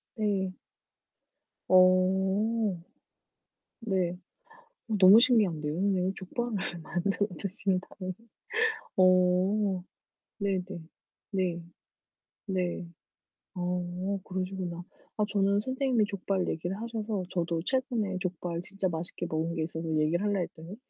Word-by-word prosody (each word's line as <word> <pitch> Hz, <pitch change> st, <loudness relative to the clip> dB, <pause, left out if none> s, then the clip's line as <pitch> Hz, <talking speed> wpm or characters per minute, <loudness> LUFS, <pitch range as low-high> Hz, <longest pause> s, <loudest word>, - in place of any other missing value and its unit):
네. 195 Hz, -4 st, 0 dB, 1.1 s
어. 190 Hz, +3 st, +4 dB, 1.0 s
네. 190 Hz, -7 st, 0 dB, 0.8 s
어 215 Hz, -, +1 dB
너무 190 Hz, +4 st, +10 dB
신기한데요, 185 Hz, -12 st, +3 dB
선생님. 190 Hz, 0 st, +1 dB
족발을 230 Hz, +4 st, -3 dB, 0.2 s
만들어 190 Hz, +5 st, 0 dB
드신다니. 185 Hz, -1 st, -2 dB, 0.8 s
어. 185 Hz, +1 st, +4 dB, 0.6 s
네네. 195 Hz, -3 st, 0 dB, 0.7 s
네. 185 Hz, -4 st, -1 dB, 0.9 s
네. 180 Hz, -2 st, -1 dB, 0.7 s
어 180 Hz, +2 st, -2 dB
그러시구나. 185 Hz, -2 st, -4 dB, 0.4 s
아 -, -, +4 dB
저는 200 Hz, 0 st, +3 dB
선생님이 260 Hz, -2 st, +1 dB
족발 195 Hz, -2 st, -1 dB
얘기를 175 Hz, +5 st, -3 dB
하셔서 220 Hz, -4 st, -3 dB
저도 170 Hz, -2 st, -1 dB
최근에 240 Hz, -7 st, 0 dB
족발 175 Hz, -2 st, -3 dB
진짜 195 Hz, +1 st, -2 dB
맛있게 170 Hz, +1 st, -4 dB
먹은 165 Hz, +1 st, -1 dB
게 160 Hz, -, 0 dB
있어서 165 Hz, 0 st, -4 dB
얘기를 160 Hz, +5 st, +2 dB
할라 205 Hz, -2 st, +1 dB
했더니 165 Hz, +2 st, -7 dB
185 Hz, 220 characters per minute, -29 LUFS, 180-205 Hz, 1.1 s, 너무